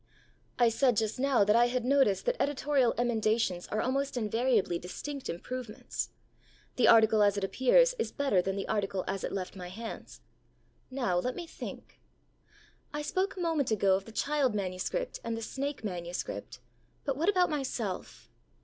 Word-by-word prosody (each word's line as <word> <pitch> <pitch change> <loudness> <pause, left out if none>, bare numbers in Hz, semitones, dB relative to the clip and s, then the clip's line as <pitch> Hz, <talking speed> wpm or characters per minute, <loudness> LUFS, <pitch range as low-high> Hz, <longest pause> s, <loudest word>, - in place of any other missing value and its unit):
I 240 -1 +5
said 245 0 +2
just 220 +2 0
now 265 -5 +3
that 210 +2 +3
I 240 +1 +5
had 245 0 -1
noticed 265 -7 +3
that - - +1
editorial 280 -3 +2
emendations 220 -6 +1
are 215 - -1
almost 270 +1 -1
invariably 225 -5 +1
distinct 275 +10 -6
improvements. 230 +5 -5 0.7
The 250 - +4
article 220 -1 +6
as 205 -1 +4
it 200 - -2
appears - - +4
is - - -1
better 275 -11 +2
than 195 +1 -2
the 195 - -3
article 195 -3 -1
as 195 0 -3
it - - -2
left 190 -1 -4
my 180 -2 -7
hands. 225 +5 -8 0.7
Now 245 -10 0
let 250 +7 -2
me 350 - -5
think. - - -9 0.9
I 295 0 -3
spoke 380 +5 -1
a - - -3
moment 325 -6 +1
ago 200 -3 +3
of 195 +1 -3
the 225 - -11
child 275 -1 +1
manuscript 195 - -3
and 230 -1 -2
the 225 - -5
snake 275 +2 -4
manuscript; 180 - -5 0.4
but 275 -2 0
what 325 +8 +1
about 365 -4 +3
myself? 250 -9 -4
235 Hz, 165 wpm, -30 LUFS, 200-280 Hz, 0.9 s, article